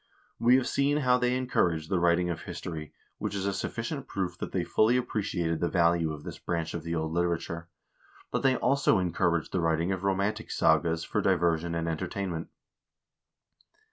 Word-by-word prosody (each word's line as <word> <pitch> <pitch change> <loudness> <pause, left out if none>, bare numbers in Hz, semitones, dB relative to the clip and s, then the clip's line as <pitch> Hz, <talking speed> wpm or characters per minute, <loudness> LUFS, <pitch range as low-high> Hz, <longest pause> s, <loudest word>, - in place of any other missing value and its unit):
We 120 +2 +5
have 130 -1 +2
seen 140 +1 +2
how 125 0 +4
they 125 0 +1
encouraged 85 -11 0
the 95 - +2
writing 85 +1 +3
of 85 - -5
his - - -7
tory, 80 -3 -6 0.3
which - - -3
is 100 -1 -2
a 100 - 0
sufficient 120 +8 -4
proof 90 -2 -3
that - - -4
they 90 - 0
fully 110 +7 +3
appreciated 95 -9 -1
the 85 - 0
value 85 -2 +2
of 75 -1 -7
this - - -8
branch 85 -2 -2
of 85 - -3
the 85 +1 -3
old 80 -1 -2
literature; 85 -1 -1 0.6
but - - 0
they 135 -1 +3
also 140 -3 +3
encouraged 85 -2 0
the 90 - 0
writing 80 +2 +1
of 95 -1 -3
romantic 100 +2 0
sagas 80 +1 +2
for 105 - -1
diversion 85 -3 +1
and 85 0 -1
entertainment. 85 +1 -3
85 Hz, 180 wpm, -29 LUFS, 85-100 Hz, 0.6 s, We